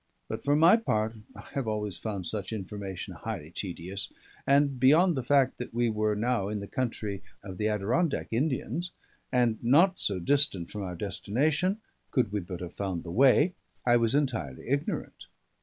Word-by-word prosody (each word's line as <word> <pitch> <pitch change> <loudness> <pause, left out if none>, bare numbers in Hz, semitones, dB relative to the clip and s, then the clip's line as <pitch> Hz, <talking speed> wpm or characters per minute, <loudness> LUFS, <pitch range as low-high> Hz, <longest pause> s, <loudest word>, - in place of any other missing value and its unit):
But - - -5
for 145 +1 +3
my 165 +8 +7
part 110 - 0 0.2
I - - -9
have 135 -4 -2
always 105 -3 0
found 100 -5 -4
such 105 +2 -3
information 100 -2 -5
highly 75 +2 -6
tedious; 95 +1 -5 0.4
and 140 -1 +3
beyond 160 +7 +5
the 130 - -1
fact 135 +1 +2
that 125 -2 -6
we 120 -1 +2
were 105 0 +1
now 115 -2 0
in 105 0 -2
the 100 - -5
country 105 -4 -3 0.2
of 95 -3 -8
the 105 - +1
Adirondack 115 - 0
Indians, 155 +7 -1 0.4
and 120 -4 +2
not 170 +10 +4
so 100 - 0
distant 95 - +1
from 105 - -5
our 90 -2 -4
destination, 150 - 0 0.3
could 125 -7 +1
we 105 - 0
but 90 -1 -7
have 90 - -6
found 95 -4 -3
the 85 - -7
way, 135 - +5 0.3
I 120 -1 +5
was 115 +1 +2
entirely 110 - -1
ignorant. 140 +2 -2
115 Hz, 175 wpm, -29 LUFS, 100-140 Hz, 0.4 s, my